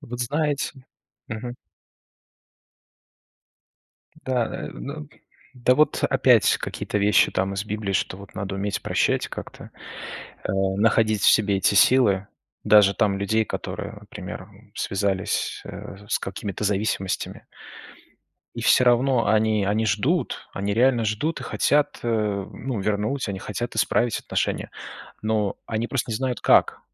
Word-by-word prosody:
Вот 120 +1 -7
знаете 145 0 -2 0.4
мгм. 120 +3 -5 2.7
Да, 125 -3 +1
э, - - -6
ну 150 +2 -7 0.5
да, 125 0 +3
вот 155 +2 +2
опять - - +4
какие-то 105 - -3
вещи 105 +1 +4
там 95 +1 -1
из 100 +1 -3
Библии, 105 -2 -3
что 95 - -1
вот 100 0 -13
надо 100 -1 -4
уметь 100 +1 -2
прощать, - - +1
как-то, - - -9 0.7
э, - - -1
находить 100 +2 +2
в - - +7
себе 100 -2 +3
эти 95 +1 +2
силы. 100 -4 +4 0.4
Даже 105 -2 +6
там 105 -3 +1
людей, 110 +3 +1
которые, - - -5
например, - - -8 0.3
связались 95 -1 -1
с 100 +1 -5
какими-то 100 +1 -5
зависимостями. 100 -2 -2 1.1
И - - -5
всё - - +5
равно 125 0 +3
они, 110 -1 +2
они 105 +3 +1
ждут. 125 - 0
Они 100 +1 -2
реально 120 -1 +3
ждут 110 +10 -1
и - - -6
хотят, 145 0 +1
ну, 110 +1 -2
вернуть, 105 +6 -1
они 100 -1 -3
хотят 110 +4 -5
исправить 115 +1 +1
отношения. - - -2 0.5
Но 110 -2 0
они 115 +1 -2
просто 130 -3 -2
не 110 - -1
знают, 130 0 -2
как. - - +4
110 Hz, 130 wpm, -24 LUFS, 100-120 Hz, 2.7 s, в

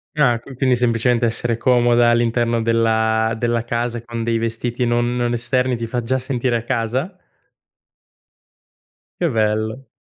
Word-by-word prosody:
Ah, 125 -6 +3
qu 130 +3 -12
quindi 130 0 +2
semplicemente 120 0 +1
essere 115 0 -1
comoda 120 -1 +3
all'interno 120 0 +1
della 110 -1 +1
della 120 0 0
casa 120 0 -2
con 115 -1 -5
dei 115 0 0
vestiti 115 +2 -2
non 120 +1 0
non 120 -1 0
esterni 125 +2 0
ti 115 -1 -4
fa 120 +2 -3
già 125 +3 0
sentire 125 -1 -1
a 115 - -2
casa? 130 - -2 2.0
Che 175 - +1
bello. 110 +2 -1
120 Hz, 145 wpm, -20 LUFS, 115-125 Hz, 2.0 s, Ah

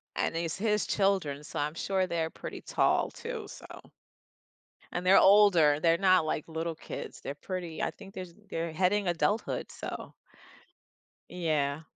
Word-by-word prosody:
And 165 - -1
it's 165 +1 -2
his 210 0 +1
children, 190 -8 +1
so - - -7
I'm 150 +1 -1
sure 190 +1 0
they're 165 -2 -1
pretty - - -8
tall - - +1
too, 460 -3 -6
so. - - -11 1.3
And 180 +1 -3
they're 190 - +8
older, 180 -7 +6
they're 165 0 +4
not 185 -4 +4
like 155 - -1
little 165 +1 -3
kids, - - -8
they're 140 - -4
pretty. 175 +1 -5
I - - 0
think 195 -1 -13
there's 180 -2 -7 0.2
they're 165 0 -2
heading 190 +3 +1
adulthood, 200 +6 -1
so. - - -7 1.2
Yeah. 155 -4 -1
175 Hz, 150 wpm, -30 LUFS, 160-195 Hz, 1.3 s, they're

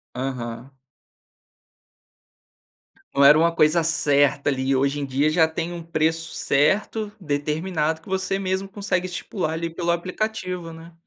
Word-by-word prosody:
Aham. 125 -1 -5 2.4
Não 140 0 +4
era 150 +2 +8
uma 165 +1 +3
coisa 160 +1 +3
certa, 145 -3 +2
ali, 135 0 0
hoje 140 +2 +1
em - - -2
dia 140 +3 +1
já 160 +1 +4
tem 165 +2 -4
um 170 -1 -7
preço 160 0 -1
certo, 205 +9 +1
determinado 155 +1 -1
que - - -20
você 190 0 -1
mesmo 190 0 -2
consegue 195 -2 -2
estipular, 180 -2 -3
ali, 165 +1 -3
pelo 170 +1 -1
aplicativo, 180 -1 -3
né. 165 +1 -12
165 Hz, 135 wpm, -23 LUFS, 145-180 Hz, 2.4 s, era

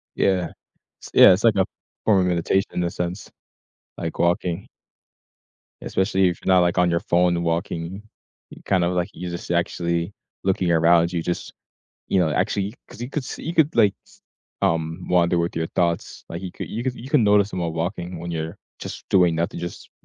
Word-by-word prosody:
Yeah, 90 -3 +1 0.5
s - - -9
yeah, - - +9
it's 95 - -1
like 110 -3 +5
a 95 -1 +3 0.4
form 100 -4 +5
of - - +1
meditation 90 +3 +1
in 90 - -1
a 85 - 0
sense, 90 +3 -4 0.7
like 80 - -4
walking. 85 +1 0 1.2
Especially 95 -1 +1
if 85 - -2
you're 95 - +3
not, 90 - +6
like, 90 0 +2
on 90 0 +4
your 85 - +2
phone 90 0 +2
and 85 - -2
walking, 85 +3 -2 0.5
you - - -13
kind 95 -3 +2
of, 90 +1 +1
like 90 -1 -1
you 90 -1 -6
just 85 0 -6
actually 85 +1 -1 0.3
looking 95 -2 +1
around, 85 +1 +4
you 85 - 0
just, 90 - -3 0.5
you 95 - +2
know, 80 -3 +2
actually 100 - 0
'cause - - -12
you 125 - -4
could 140 -2 -3
s - - -6
you 165 - -4
could, 160 -2 +3
like, 105 -4 +5
s - - -23 0.4
um, 80 +2 0
wander 85 -1 +3
with 85 0 -1
your 80 0 -1
thoughts, 85 -2 -1
like 85 +2 -6
you 90 -2 -6
could - - -7
you 115 +3 -4
could 130 -1 -2
you 130 +3 -9
can 140 -7 +4
notice 105 0 +4
them 90 - -3
while 85 -2 -2
walking 85 +1 -3
when 85 0 -5
you're 80 0 -4 0.2
just - - -7
doing 90 -4 +4
nothing, 85 +1 -2
just 85 0 -7
90 Hz, 205 wpm, -23 LUFS, 85-95 Hz, 1.2 s, yeah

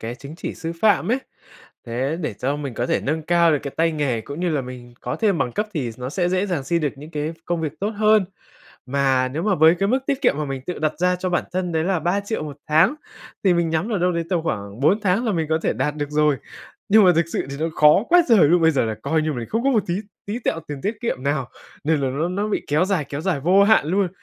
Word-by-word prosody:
cái 115 +2 -5
chứng 140 +5 -10
chỉ - - -5
sư 165 -1 -5
phạm 215 0 +3
ấy, 255 - +2 0.7
thế 130 +6 -2
để 150 -8 -2
cho 140 +7 -2
mình 140 -5 -5
có 120 - -2
thể - - +1
nâng 155 +3 -2
cao 170 0 +3
được 145 - +2
cái 140 - -4
tay 165 0 +2
nghề 140 -7 -1
cũng 140 +8 -7
như 180 - 0
là 150 -3 0
mình 125 -1 -10
có - - -4
thêm 205 -6 +1
bằng 120 - -1
cấp 210 - -1
thì 130 -7 -2
nó 125 +1 -4
sẽ 175 +3 0
dễ 185 +2 0
dàng 165 -8 -2
xin 170 +4 0
được 150 -3 -1
những 150 +3 -11
cái 150 +1 -3
công 170 -1 -2
việc 155 -3 -2
tốt 205 +2 0
hơn. 215 -1 +3 0.6
Mà 130 -1 +1
nếu 150 +6 -4
mà 205 0 +2
với 160 0 +6
cái 195 - +1
mức 255 - +3
tiết 280 -1 0
kiệm 245 - +3
mà 150 - -1
mình 135 -2 -5
tự 180 - -4
đặt 155 0 -1
ra 180 0 +2
cho 185 0 -3
bản 175 - 0
thân 180 -1 -2
đấy 160 0 0
là 185 -3 0
3.000.000 200 +4 -1
1 145 -2 -7
tháng 165 - +4 0.5
thì 185 - +4
mình 170 -1 +1
nhắm 160 +7 -1
ở 205 - +1
đâu 180 0 +1
đấy 170 0 -2
tầm 175 -3 +1
khoảng 100 -7 -4
4 190 +10 +3
tháng 200 +4 +1
là 220 - 0
mình 160 -3 -1
có 160 0 +2
thể - - +1
đạt 150 - -1
được 145 -1 -3
rồi. 150 -1 +2 0.5
Nhưng 215 0 +7
mà 180 - +6
thực 170 - +3
sự - - -2
thì 140 - -5
nó 160 - 0
khó 150 +7 +5
quá 350 0 +6
trời 200 -11 +6
luôn! 170 +1 +4
Bây 160 - +6
giờ 135 -6 +1
là 110 -1 -2
coi 160 -1 +1
như 155 0 -1
mình 120 -3 -5
không 225 +2 -1
có 275 - +4
một 220 -5 +2
tí 175 - -1 0.3
tí 215 +4 -3
tẹo 165 - -2
tiền 145 -2 -5
tiết 210 +3 -2
kiệm 230 - -2
nào 140 -2 -1 0.4
nên 155 -1 +2
là 135 - 0
nó 150 +6 -1
nó 200 +4 -2
bị 210 - -2
kéo 150 +5 +2
dài 190 -6 0
kéo 140 +1 -4
dài 175 -5 -1
vô 185 +6 +4
hạn 215 -8 +4
luôn. 190 +3 +1
160 Hz, 285 wpm, -22 LUFS, 145-190 Hz, 0.7 s, Nhưng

